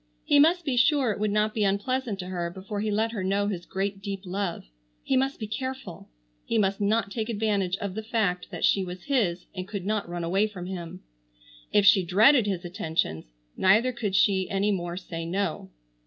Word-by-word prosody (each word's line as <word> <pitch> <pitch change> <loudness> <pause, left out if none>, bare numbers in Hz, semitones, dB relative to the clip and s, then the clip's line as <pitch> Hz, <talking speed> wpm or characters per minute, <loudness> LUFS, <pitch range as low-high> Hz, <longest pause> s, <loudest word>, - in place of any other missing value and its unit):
He 290 - +5
must 335 +3 +4
be 265 -4 0
sure 265 -1 +4
it 205 - -4
would 215 0 +1
not 210 +1 +1
be 215 - 0
unpleasant 210 +3 0
to 185 - -6
her 175 -2 -2
before 195 +3 -6
he 215 - -1
let 220 +2 +1
her 210 -5 -4
know 200 +2 +1
his 180 -4 -4
great 195 +1 -3
deep 195 -1 -4
love. 185 -1 -3 0.4
He 270 - 0
must 270 +2 +1
be 220 - -3
careful. 260 -3 -6 0.3
He 230 - -1
must 200 -1 +1
not 205 0 +1
take 220 +1 -3
advantage 205 -4 0
of 200 -2 -4
the 220 - -4
fact 215 -5 -1
that - - -1
she 195 - +3
was 180 0 -7
his 205 -11 0
and 185 -1 -5
could 200 -3 -5
not 210 -3 -1
run 175 0 -4
away 195 +5 +2
from 185 -4 -8
him. 180 -1 -7 0.7
If 205 - +4
she 195 -1 +6
dreaded 215 - +5
his 185 -3 -2
attentions, 160 - -2 0.3
neither 215 +7 +4
could 220 -5 -3
she 190 0 +3
any 200 +1 +1
more 175 -2 -3
say 165 -3 -6
no. 170 - -2
200 Hz, 205 wpm, -27 LUFS, 185-220 Hz, 0.7 s, she